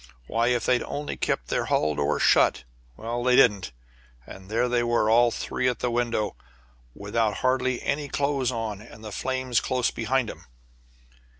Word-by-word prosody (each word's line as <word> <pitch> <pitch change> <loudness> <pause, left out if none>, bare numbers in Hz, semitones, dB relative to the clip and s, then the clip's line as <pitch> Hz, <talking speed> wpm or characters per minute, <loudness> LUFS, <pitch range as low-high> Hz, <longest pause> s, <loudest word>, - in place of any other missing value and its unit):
Why, 115 - 0
if 120 -1 +1
they'd 125 -1 +2
only 145 0 -4
kept - - -2
their - - 0
hall 75 0 +1
door 70 -1 0
shut - - +4 0.3
well, 120 +2 -4
they 125 0 +4
didn't, 105 - +4 0.5
and 95 0 -12
there 115 +3 +1
they 120 0 +1
were, 120 -2 +1
all 120 +1 +5
three 125 +2 -2
at 125 - 0
the 125 - -2
window, 120 -3 -1 0.6
without 105 +1 -1
hardly 130 -1 +1
any 145 0 -1
clothes 140 -3 0
on, 110 -4 -4
and 110 0 -14
the 105 - -7
flames 130 +1 -1
close 130 -2 0
behind 120 +1 -1
'em. - - -15
120 Hz, 170 wpm, -25 LUFS, 110-125 Hz, 0.6 s, all